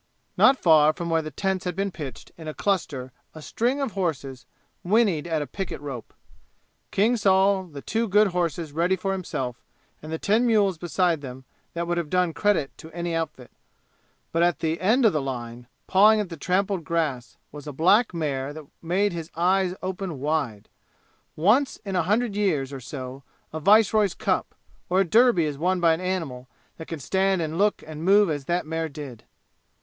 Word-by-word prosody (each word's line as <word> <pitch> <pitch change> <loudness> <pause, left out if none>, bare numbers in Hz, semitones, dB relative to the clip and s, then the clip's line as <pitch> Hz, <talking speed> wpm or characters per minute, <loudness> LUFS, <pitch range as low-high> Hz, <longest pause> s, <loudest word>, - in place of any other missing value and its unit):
Not 265 +1 +5
far 155 -5 +5
from 170 +1 -4
where 165 0 +2
the 155 - -6
tents 190 +5 -2
had 180 -2 -3
been 195 +1 -1
pitched 140 -8 -8
in 160 -2 -10
a 155 - -5
cluster 145 -10 -2 0.2
a 155 - -9
string 245 - -1
of 275 -5 -2
horses 140 -10 -3 0.4
winnied 190 -5 +2
at 160 -3 -1
a - - -6
picket 185 +6 -5
rope. 135 -5 -7 0.8
King 220 +5 +2
saw 195 -1 +3
the 150 -7 -10
two 225 +1 -1
good 210 +1 +4
horses 170 -3 -2
ready 170 +5 +1
for 195 +1 -3
himself, 130 -10 -4 0.4
and 160 +1 -5
ten 225 +4 +2
mules 200 -6 +2
beside 175 -2 0
them 130 -1 -9 0.3
that 170 0 -2
would 175 0 -1
have 165 -3 -4
done 180 -1 +1
credit 185 -6 0
to 160 - -11
any 170 0 -3
outfit. 160 -6 -4 0.8
But 165 - +1
at 175 -4 +3
the 160 +1 -2
end 230 +7 +3
of 215 - +5
the 155 - 0
line, 120 -2 -6 0.2
pawing 215 +3 +5
at 205 -4 -2
the 165 - -6
trampled 185 +3 0
grass, 150 -7 -2
was 145 0 -10
a - - -4
black 190 - +3
mare 145 -5 -3
that 155 -1 -9 0.2
made 185 +4 0
his 165 -1 -6
eyes 185 +2 +2
open 185 -5 -4
wide. 140 -8 -2 0.7
Once 220 - +2
in 195 -1 -3
a 180 - +3
hundred 210 +5 0
years 155 -10 0
or 135 - -5
so 130 +1 -7 0.3
a 160 - -3
viceroy's 210 +2 +4
cup, - - -1 0.3
or 185 +2 +3
a - - +2
Derby 220 -2 +4
is 145 -2 -4
won 180 +3 +1
by 170 -2 +4
an 160 - -3
animal 160 -9 -3 0.3
that 160 - -9
can 165 - -5
stand 190 +6 +1
and 160 +1 -3
look 205 +1 +2
and 155 0 -8
move 200 0 +5
as 145 -2 -4
that 175 +3 -1
mare 160 0 -3
did. 140 -5 -9
170 Hz, 190 wpm, -25 LUFS, 150-195 Hz, 0.8 s, Not